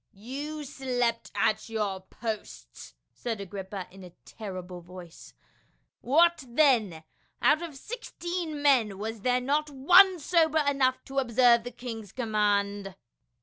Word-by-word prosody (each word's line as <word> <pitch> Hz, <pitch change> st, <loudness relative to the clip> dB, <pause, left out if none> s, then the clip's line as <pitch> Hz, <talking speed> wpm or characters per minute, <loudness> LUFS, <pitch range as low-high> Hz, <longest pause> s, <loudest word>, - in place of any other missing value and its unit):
"You 285 Hz, +9 st, -6 dB
slept 250 Hz, -4 st, -2 dB
at 215 Hz, +2 st, 0 dB
your 210 Hz, -4 st, -2 dB
posts 65 Hz, -, -7 dB
!" -, -, -51 dB
said 225 Hz, -3 st, -4 dB
Agrippa 195 Hz, 0 st, -6 dB
in 190 Hz, 0 st, -13 dB
a 180 Hz, -, -10 dB, 0.2 s
ter 215 Hz, -3 st, -8 dB
rible 180 Hz, -1 st, -9 dB
voice. 175 Hz, -1 st, -12 dB, 0.6 s
"What 330 Hz, +4 st, +3 dB
then, 235 Hz, -, +2 dB, 0.4 s
out 310 Hz, -, +3 dB
of 335 Hz, -4 st, -7 dB
sixteen 345 Hz, -, -5 dB
men 240 Hz, -9 st, +3 dB
was 220 Hz, +1 st, -5 dB
there 250 Hz, +2 st, +2 dB
not 295 Hz, +4 st, 0 dB
one 360 Hz, +8 st, +6 dB
sober 320 Hz, -1 st, +2 dB
enough 265 Hz, -2 st, +1 dB
to 270 Hz, 0 st, -2 dB
observe 240 Hz, -2 st, +4 dB
the 245 Hz, -, -6 dB
king's 230 Hz, -3 st, -8 dB
command?" 205 Hz, -4 st, 0 dB
235 Hz, 135 wpm, -28 LUFS, 200-285 Hz, 0.6 s, one